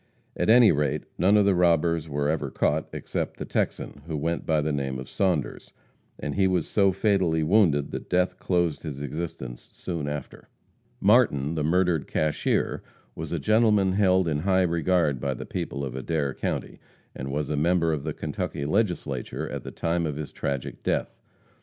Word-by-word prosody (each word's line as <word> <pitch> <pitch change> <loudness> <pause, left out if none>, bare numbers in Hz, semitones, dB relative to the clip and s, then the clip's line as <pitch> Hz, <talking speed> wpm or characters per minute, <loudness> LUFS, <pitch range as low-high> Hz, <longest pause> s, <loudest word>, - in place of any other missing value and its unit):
At - - 0
any 120 -1 +7
rate, 75 -1 0 0.2
none 100 +4 +5
of 105 - +4
the 100 - +4
robbers 85 -2 +2
were 70 0 -1
ever 80 +1 -1
caught, 75 +2 0
except - - -4
the - - -5
Texan, 70 - -2
who 80 -2 -3
went 85 +3 -2
by 80 -1 +3
the 75 +1 0
name 65 -2 -2
of 65 0 -7
Saunders, 90 -7 -1 0.5
and 75 - -3
he 95 -1 +3
was 90 -4 0
so 100 -2 +3
fatally 95 -6 +1
wounded 80 -5 +3
that - - -6
death 90 0 +1
closed 85 -4 0
his 75 -4 -6
existence 70 -4 -6
soon 85 -5 -4
after. 75 -2 -7 0.5
Martin, 95 - +3
the 80 -2 -1
murdered 85 -1 +1
cashier, 75 -1 0 0.3
was 80 -1 -6
a 85 - 0
gentleman 105 +3 +3
held 95 -2 +3
in 75 -2 0
high 95 +2 +2
regard 85 -4 +1
by 70 -2 -1
the - - -7
people 70 0 -4
of 65 - -6
Adair 70 +1 -1
county, - - -4 0.4
and 65 +1 -5
was 75 +1 -2
a - - 0
member 85 +2 +2
of 75 -3 -3
the - - -2
Kentucky 70 - -4
Legislature 95 +3 -1
at - - -4
the - - -7
time 85 0 -1
of 75 - -3
his 75 -1 -6
tragic 70 -2 -4
death. - - -1
80 Hz, 180 wpm, -26 LUFS, 75-90 Hz, 0.5 s, any